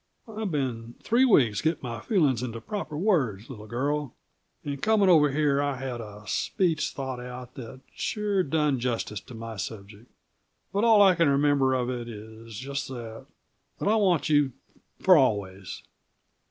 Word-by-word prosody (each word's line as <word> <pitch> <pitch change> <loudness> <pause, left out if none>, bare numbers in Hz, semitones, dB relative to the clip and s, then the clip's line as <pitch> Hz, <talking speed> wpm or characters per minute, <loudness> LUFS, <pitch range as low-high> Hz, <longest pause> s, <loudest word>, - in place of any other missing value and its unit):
"I've 220 -2 -4
been 120 -6 -3
three 245 +4 +3
weeks 120 - +4
getting 160 -2 -1
my 115 -2 -4
feelings 150 - +1
into 115 -2 -4
proper 155 - -5
words, 135 - 0
little 110 -4 -10
girl, 140 +4 -2 0.5
and 140 -1 -4
coming 215 -3 +3
over 150 -4 +6
here 140 0 +1
I 145 -1 -1
had 130 -2 -5
a 105 -1 -10
speech 165 - 0
thought 130 -2 -5
out 125 0 -8
that 130 +1 -9
sure 205 -2 -1
done 150 -4 +1
justice 115 -4 -2
to 125 - -12
my 115 -1 -7
subject. 105 +3 -8 0.6
But 205 +3 +2
all 220 -3 +7
I 190 -2 +6
can 165 -4 +3
remember 140 -2 +3
of 125 -1 -1
it 120 -1 -5
is 110 0 -10
just 135 +2 -4
that 115 -4 -8 0.5
that - - -3
I 215 - +4
want 190 -7 +2
you 145 -4 +3 0.5
for 185 -2 +6
always." 100 -8 -1
135 Hz, 165 wpm, -27 LUFS, 115-160 Hz, 0.6 s, all